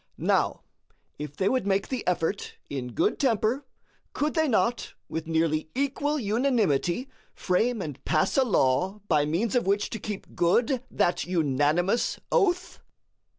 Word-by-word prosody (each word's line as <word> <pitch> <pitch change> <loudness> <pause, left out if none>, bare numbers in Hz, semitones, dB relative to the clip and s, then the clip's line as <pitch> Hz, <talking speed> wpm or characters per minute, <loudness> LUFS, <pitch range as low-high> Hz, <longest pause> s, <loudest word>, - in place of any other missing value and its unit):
Now, - - +1 0.6
if 150 -1 -6
they 190 - +1
would 255 -2 +1
make 195 0 +1
the 255 -3 -2
effort 180 +2 -1
in 125 -3 -4
good - - +1
temper, 255 +1 +1 0.5
could 300 +1 0
they 315 -1 +2
not 235 0 0
with 160 0 -5
nearly 160 -1 0
equal 280 +2 0
unanimity 220 - +1 0.3
frame 220 +3 0
and 145 -3 -7
pass 155 - +1
a 270 - +5
law 190 - +1
by 150 -5 +3
means 185 +9 0
of 245 -6 +1
which 200 +1 +1
to 225 - -4
keep 205 -1 -7
good 235 +9 +2
that 175 - +1
unanimous 165 - +1
oath? 365 -6 +1
200 Hz, 145 wpm, -27 LUFS, 160-245 Hz, 0.6 s, a